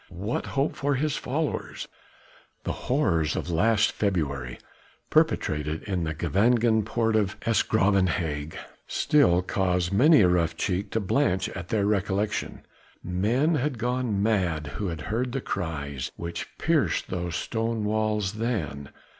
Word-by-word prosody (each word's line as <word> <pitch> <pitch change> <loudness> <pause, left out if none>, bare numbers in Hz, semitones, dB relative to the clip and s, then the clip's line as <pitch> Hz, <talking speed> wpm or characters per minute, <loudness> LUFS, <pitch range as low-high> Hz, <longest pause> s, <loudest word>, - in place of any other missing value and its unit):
what 100 +6 -2
hope 140 +3 +1
for 140 0 0
his 150 +2 0
followers? 150 +3 -3 0.8
The - - -2
horrors 85 - 0
of 90 - -3
last 105 +5 +3
February 70 - -2 0.5
perpetrated 75 +1 +1
in 95 -5 -2
the 80 0 -3
Gevangen 110 +7 +2
Poort 110 +1 0
of 105 -3 +1
'S 115 -1 +3
Graven 100 -3 +2
Hage 80 -3 -3 0.3
still 95 -12 +3
cause 90 -2 0
many 135 +7 +6
a 90 - +6
rough 85 -2 +1
cheek 95 +3 -1
to 115 - 0
blanch 95 -2 +1
at 90 -2 -7
their 105 -3 +1
recollection. 100 0 -1 0.4
Men 115 - +1
had 145 -3 -1
gone 120 -3 -1
mad 90 -8 +1
who 105 - -3
had 85 -3 -4
heard 120 +8 -2
the 135 - 0
cries 70 - -4
which 85 0 -5
pierced - - +1
those 90 -2 -3
stone 115 -1 -2
walls 105 -2 0
then. 85 - -3
100 Hz, 140 wpm, -26 LUFS, 85-115 Hz, 0.8 s, many